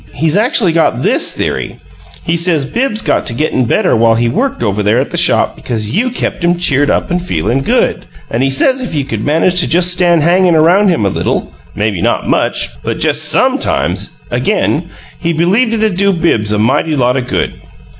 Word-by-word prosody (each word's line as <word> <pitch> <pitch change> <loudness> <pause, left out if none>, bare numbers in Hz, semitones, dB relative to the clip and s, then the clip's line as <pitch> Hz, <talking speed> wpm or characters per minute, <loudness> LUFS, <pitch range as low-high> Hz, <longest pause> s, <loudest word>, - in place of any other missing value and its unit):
He's 160 +2 +1
actually 215 -3 +2
got 165 0 0
THIS - - +2
theory: - - -3 0.5
he 165 - -1
says 170 -4 +1
Bibbs 230 - -2
got - - 0
to 120 - -2
gettin' 130 -2 0
better 185 - +1
while 115 0 +3
he 120 +1 0
worked 260 - -2
over 105 -1 -1
there 105 +3 +1
at 130 - -1
the - - -4
shop 175 - +1
because 110 -3 -4
you 245 +5 +1
kept 240 -6 -4
him 175 0 +2
cheered 145 -5 +1
up - - -1
and 180 0 0
feelin' 135 - -1
good. - - 0 0.3
And 115 - -1
he 135 - +1
says 255 - +2
if 245 - -5
you 140 -2 -1
could 110 -5 -4
manage 165 +4 +2
to 170 - +1
just 180 +1 +3
stand 175 -3 +2
him - - +2
hangin' 180 -1 +3
around 180 +6 +4
a 175 - +1
little 95 - -2 0.2
maybe 105 -4 -2
not - - -1
much, - - -1
but - - -3
just - - 0
SOMEtimes - - -1
again, - - -1 0.3
he 170 - -1
believed 195 +9 +1
it'd 215 -4 -1
do 200 +1 +2
Bibbs 165 - 0
a 105 - 0
mighty 130 +8 +1
lot 125 -2 +1
o' 130 - 0
good. 125 - -3
165 Hz, 205 wpm, -13 LUFS, 125-185 Hz, 0.5 s, around